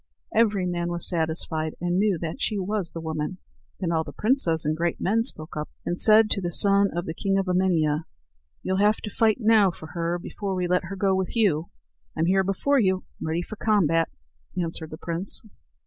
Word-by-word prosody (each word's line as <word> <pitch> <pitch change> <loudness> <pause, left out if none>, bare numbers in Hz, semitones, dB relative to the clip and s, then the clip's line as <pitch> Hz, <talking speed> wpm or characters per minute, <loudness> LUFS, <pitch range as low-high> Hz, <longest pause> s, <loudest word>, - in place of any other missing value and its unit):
Every 210 -4 +3
man 175 -1 -2
was 175 -1 -1
satisfied 160 -2 -2
and 175 +1 0
knew 205 -3 +2
that 160 -1 -4
she 210 - 0
was 195 -2 -2
the 165 - -7
woman. 160 +2 -4 0.4
Then 180 -3 -1
all 160 -1 +1
the - - -9
princes 195 - +2
and 155 +1 +1
great 170 +1 -1
men 220 +4 +1
spoke 155 -9 -1
up, 150 0 -4 0.2
and 175 - -2
said 215 0 +7
to 200 - +2
the 175 -1 -2
son 200 +2 +4
of 175 - -2
the 160 - -4
king 195 +3 0
of 195 - 0
Emania: 170 -4 +1 0.6
"You'll 190 0 0
have 210 +1 +4
to 210 - -5
fight 220 -2 +3
now 215 -3 +5
for 160 -2 -10
her 170 0 -1
before 195 +2 -5
we 180 -1 -1
let 180 0 +1
her 195 +3 -6
go 195 0 +1
with 190 +3 -2
you." 175 -8 +1 0.5
"I'm 160 - +2
here 190 +2 +3
before 230 +9 +1
you, 190 -4 +1 0.2
ready 160 +2 -2
for 215 - -9
combat," 165 -8 +2 0.5
answered 165 -2 -3
the 155 - -8
prince. 170 +3 -2
180 Hz, 205 wpm, -25 LUFS, 165-200 Hz, 0.6 s, said